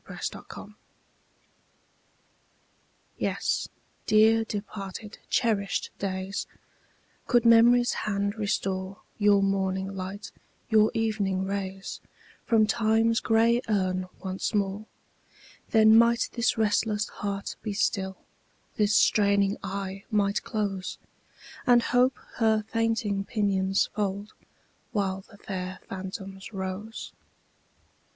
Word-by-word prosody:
DEPARTED - - -5
DAYS - - -11 2.5
YES, - - -1 0.4
dear 220 +1 +5
departed, 205 -1 -6
cherished 210 -5 0
days, 190 0 -3 0.8
Could 240 -2 +3
Memory's 240 +1 +6
hand 200 -1 -1
restore 195 -3 -2 0.2
Your 205 -1 +5
morning 190 0 -1
light, 195 +2 -6 0.4
your 215 -1 +5
evening 205 -4 0
rays, 195 -1 -4 0.5
From 225 -2 +4
Time's 225 +1 +2
gray 230 +2 +3
urn 185 -3 0 0.2
once 190 +3 -2
more, 200 +1 -1 0.8
Then 220 0 +6
might 235 +1 +4
this 235 -1 +1
restless 210 -1 +1
heart 200 -1 -4
be 215 - -3
still, 190 -2 -1 0.6
This 210 -1 +3
straining 200 -1 +3
eye 195 0 -5
might 205 -2 +1
close, 200 -4 -3 0.7
And 240 -1 +6
Hope 250 +1 +3 0.2
her 220 -2 +3
fainting 225 -3 0
pinions 195 -3 +1
fold, 205 0 -3 0.6
While 195 -3 -1
the 205 - -15
fair 185 -2 -5
phantoms 190 +1 -7
rose. 195 +3 -6
205 Hz, 100 wpm, -27 LUFS, 195-220 Hz, 2.5 s, Memory's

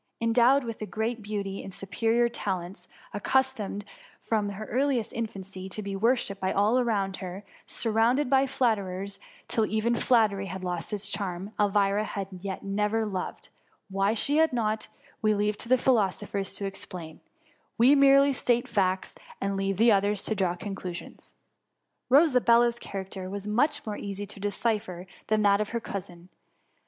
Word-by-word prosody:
Endowed 240 +4 +4
with 230 -2 -6
great 225 +1 -2
beauty 200 -2 -4
and 195 - -8
superior 225 +6 +1
talents; 190 -5 -4 0.3
accustomed 210 -3 0 0.3
from 210 -2 -1
her 200 +2 -6
earliest 260 -2 0
infancy 195 -4 -5
to 215 +3 -6
be 200 0 -4
worshipped 215 -2 +1
by 190 - +1
all 210 +5 +3
around 200 -6 0
her; 185 +1 -7 0.2
surrounded 230 +5 +2
by 270 +1 +3
flatterers, 200 -7 -1 0.3
till 225 - +1
even 220 +2 +1
flattery 215 -6 +2
had 190 0 -6
lost 175 -2 -3
its 205 -1 -3
charm, 195 +1 -3
Elvira 205 0 +2
had 200 -2 -4
yet 190 +1 -6
never 210 +3 0
loved; 190 -3 -5 0.4
why 195 +3 +1
she 285 +6 +1
had 320 0 +4
not, 220 -3 -1 0.3
we 215 -2 +3
leave 210 +1 +1
to 230 - -9
philoso 235 -6 +2
phers 195 -1 -3
to 200 - -4
explain; 180 -4 -7 0.6
we 245 +5 +6
merely 275 0 +6
state 240 -1 +1
facts 190 -3 0 0.3
and 195 0 -1
leave 195 0 -1
others 205 -3 +3
to - - 0
draw 185 -4 0
conclusions. 185 -2 -7 0.8
Rosabella^s 240 -5 +5
character 190 -2 -6
was 200 +1 -5
much 290 +8 +1
more 210 -2 -4
easy 200 0 -5
to 200 0 -8
decipher 205 -3 -2 0.2
than 215 -1 +2
that 200 0 +4
of 210 - -2
her 235 - -2
cousin. 180 -5 -7
210 Hz, 150 wpm, -27 LUFS, 195-235 Hz, 0.8 s, we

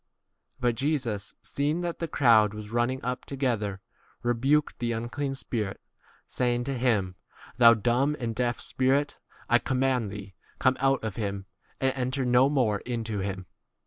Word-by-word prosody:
But 120 -1 +2
Jesus, 125 -6 -2
seeing 150 +4 -1
that 175 -1 -3
the 165 - -2
crowd 110 -8 +4
was 105 0 -8
running 120 +3 0
up 125 0 -2
together, 115 -8 -2 0.4
rebuked 135 +5 +1
the 120 -1 -1
unclean 135 +5 -3
spirit, 110 -6 -3 0.5
saying 120 -1 0
to 135 +2 -2
him, 105 -7 0 0.4
Thou 115 -1 +8
dumb 125 +6 +1
and 115 -3 -2
deaf 120 +1 -1
spirit, 135 +3 0 0.3
I 120 - +4
com 130 - -2
mand 130 -4 +1
thee, 100 -1 -8 0.2
come 130 0 +3
out 135 -1 +2
of 110 -4 -4
him 100 -3 -3 0.3
and 135 - +2
26 135 - -7
enter 130 +1 -1
no 125 +2 +4
more 120 -8 +1
into 115 -3 -3
him. 95 -1 -4
120 Hz, 160 wpm, -27 LUFS, 110-135 Hz, 0.5 s, Thou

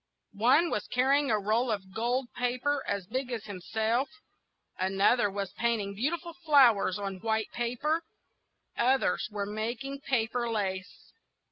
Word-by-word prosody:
One 255 +11 +4
was - - -2
carrying 275 +3 +2
a 215 - +3
roll 220 +5 +1
of 195 -3 -3
gold 240 +3 -1
paper 255 +3 0
as 200 -2 -2
big 255 +5 -3
as 230 -4 -4
himself; 220 +6 -1 0.7
another 195 +4 +3
was 200 -1 -4
painting 225 -4 -1
beautiful 335 - -2
flowers 250 - +5
on 195 -2 -4
white 220 -1 -1
paper; 250 +7 -1 0.7
others 255 -7 +2
were 205 -1 -3
making 230 +6 -4
paper 240 -3 0
lace. 190 -4 -4
230 Hz, 130 wpm, -29 LUFS, 205-260 Hz, 0.7 s, flowers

